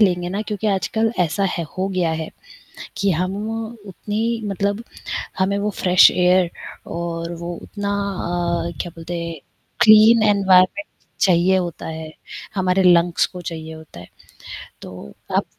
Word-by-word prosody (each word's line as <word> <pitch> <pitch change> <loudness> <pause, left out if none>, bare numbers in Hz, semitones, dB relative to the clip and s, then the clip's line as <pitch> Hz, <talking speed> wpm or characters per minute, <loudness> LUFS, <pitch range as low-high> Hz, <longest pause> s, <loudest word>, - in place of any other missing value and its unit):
लेंगे 180 -4 +2
ना 200 +3 -3
क्योंकि 210 0 -4
आजकल 220 +4 0
ऐसा 180 +4 +1
है 170 - -2
हो 190 +1 0
गया 180 -4 0
है, 155 - -7 0.7
कि 200 -1 +1
हम 185 +4 -1 0.5
उतनी 220 +4 -3
मतलब 200 +3 -2 0.5
हमें 200 +2 +1
वो 210 +1 -1
फ्रेश 180 0 +7
एयर 180 -1 +3 0.4
और 170 0 -4
वो 170 0 -5
उतना 205 -1 -5
अ, 175 -4 -2
क्या 175 - -3
बोलते 165 +1 -6
हैं 170 0 -5 0.5
क्लीन 220 +1 +7
एनवायरमेंट 195 0 +4 0.4
चाहिए 185 -1 +4
होता 175 -3 -3
है। 160 -1 -6 0.4
हमारे 185 0 +1
लंग्स 175 -1 +4
को 180 - -10
चाहिए 160 -2 -6
होता 160 - -12
है। - - -11 0.8
तो 90 -7 -10 0.2
आप - - +2
185 Hz, 140 wpm, -21 LUFS, 170-200 Hz, 0.8 s, फ्रेश